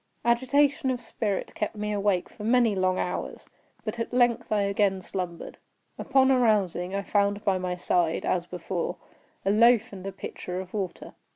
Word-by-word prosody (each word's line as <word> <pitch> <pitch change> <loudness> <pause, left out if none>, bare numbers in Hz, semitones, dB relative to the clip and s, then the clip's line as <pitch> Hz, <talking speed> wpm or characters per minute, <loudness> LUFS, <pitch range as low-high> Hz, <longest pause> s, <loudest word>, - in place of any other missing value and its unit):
Agitation 265 +3 +2
of 255 -1 -1
spirit 220 -4 -3
kept 210 - -3
me 210 0 -3
awake 200 -3 +1
for 210 - -11
many 235 -1 +3
long 185 -1 +1
hours, - - -3 0.4
but 220 +2 -4
at 230 - -3
length 245 -3 +2
I 210 -1 +3
again 200 -1 +1
slumbered. 180 -2 -6 0.4
Upon 270 0 +3
arousing, 200 -7 +2
I 200 - -1
found 205 +1 +1
by 190 -2 +2
my 180 -1 -2
side, 175 -2 0
as 175 -1 0
before, 180 0 -3 0.5
a 195 - +3
loaf 230 +1 +4
and 190 0 -7
a - - -3
pitcher 180 -1 -6
of 185 -1 -8
water. 195 -4 -4
205 Hz, 170 wpm, -27 LUFS, 185-235 Hz, 0.5 s, loaf